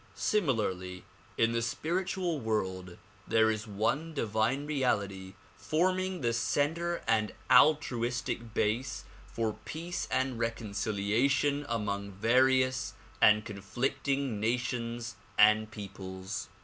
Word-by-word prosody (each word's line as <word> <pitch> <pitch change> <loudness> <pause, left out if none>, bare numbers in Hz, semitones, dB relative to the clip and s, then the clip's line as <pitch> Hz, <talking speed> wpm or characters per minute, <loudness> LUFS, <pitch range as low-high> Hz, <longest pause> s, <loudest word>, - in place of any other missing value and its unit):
Similarly, 100 - 0 0.3
in 115 0 +3
the 115 0 0
spiritual 170 +6 -1
world 95 -6 -2 0.3
there 110 0 +4
is 110 +1 -4
one 130 +11 -1
divine 115 +3 0
reality 100 -10 -1 0.2
forming 185 +2 0
the 120 -2 +1
center 160 +8 0
and 110 -1 +2 0.2
altruistic 125 -4 +3
basis 115 +5 0 0.2
for 110 -2 -2
peace 170 +6 -4
and 130 -2 0
reconciliation 115 +6 0
among 100 -3 -2
various 130 +5 +2 0.3
and 105 0 +6
conflicting 120 +4 -2
nations 120 0 -2 0.2
and 110 +1 +5
peoples. 95 -2 -7
115 Hz, 95 wpm, -31 LUFS, 105-140 Hz, 0.3 s, and